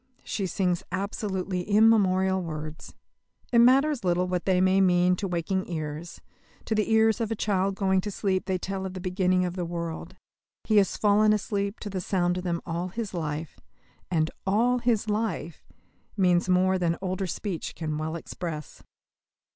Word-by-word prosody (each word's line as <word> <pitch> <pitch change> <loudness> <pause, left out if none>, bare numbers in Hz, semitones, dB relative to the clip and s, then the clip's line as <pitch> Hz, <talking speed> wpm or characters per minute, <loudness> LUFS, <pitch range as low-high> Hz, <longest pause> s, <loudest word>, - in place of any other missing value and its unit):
She 195 -3 -2
sings 180 -1 0
absolutely 190 -1 -2
immemorial 190 -2 +3
words. 155 -2 -7 0.6
It 235 - +5
matters 270 +3 +4
little 180 0 +2
what 180 -1 -2
they 185 -2 +3
may 190 +1 +4
mean 180 -1 +4
to 200 - -2
waking 180 +2 -2
ears; 155 +1 -5 0.5
to - - -1
the 215 0 0
ears 220 +1 +4
of 225 - -1
a 225 - -1
child 195 -2 0
going 190 -1 +2
to 210 - -4
sleep 190 -2 -1
they 190 -1 +1
tell 190 +1 -4
of 190 - -9
the - - -4
beginning 185 0 +1
of 180 0 -4
the 180 - -2
world. 170 +1 -5 0.5
He 215 - +2
has 200 -2 +3
fallen 210 0 +4
asleep 200 0 -2
to 210 - -5
the 185 -1 -3
sound 180 -1 0
of - - -7
them 170 -2 -2
all 170 +2 -3
his 210 +2 -5
life; 155 -2 -4 0.5
and 160 -2 +1 0.2
"all 240 +6 +3
his 235 -3 +1
life" 210 -7 -2 0.5
means 180 -2 +3
more 185 +1 +3
than 170 -1 0
older 185 0 -2
speech 180 -1 -4
can 155 -2 -3
well 160 +1 -3
express. 165 -2 -6
185 Hz, 170 wpm, -27 LUFS, 175-205 Hz, 0.6 s, It